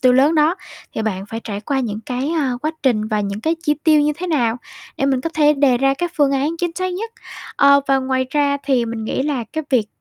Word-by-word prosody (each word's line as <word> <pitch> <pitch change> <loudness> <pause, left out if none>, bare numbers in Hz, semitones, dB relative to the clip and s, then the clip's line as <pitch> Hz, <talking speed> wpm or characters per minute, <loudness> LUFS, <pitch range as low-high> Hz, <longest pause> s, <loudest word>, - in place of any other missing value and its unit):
tiêu 255 -1 +5
lớn 275 +5 +4
đó 310 +3 +3 0.4
thì 220 - -2
bạn 195 -2 -3
phải 225 +2 -6
trải 205 -1 -4
qua 270 +5 -1
những 215 -3 -3
cái, 260 +6 -2
ơ, 255 -3 -1
quá 310 - 0
trình 220 -5 +1
và 215 -2 0
những 200 +1 -3
cái 320 +5 +1
chi 300 -2 +2
tiêu 310 -2 +5
như 295 +1 +2
thế 365 +2 -4
nào 245 -8 +1 0.4
để 275 - 0
mình 265 -2 +1
có 330 - -3
thể 300 -1 +4
đề 275 -3 +3
ra 270 +1 +2
các 345 +4 -3
phương 285 -3 +3
án 285 +5 0
chính 350 -1 -1
xác 370 0 -2
nhất. 450 +4 -4 0.5
Ờ, 280 0 +6
và 270 0 +4
ngoài 260 0 -1
ra 285 -1 +2
thì 260 -4 +2
mình 225 -1 -4
nghĩ 245 - -1
là 275 -5 -1
cái 315 -1 -3
việc 235 -5 +2
275 Hz, 260 wpm, -19 LUFS, 240-300 Hz, 0.5 s, Ờ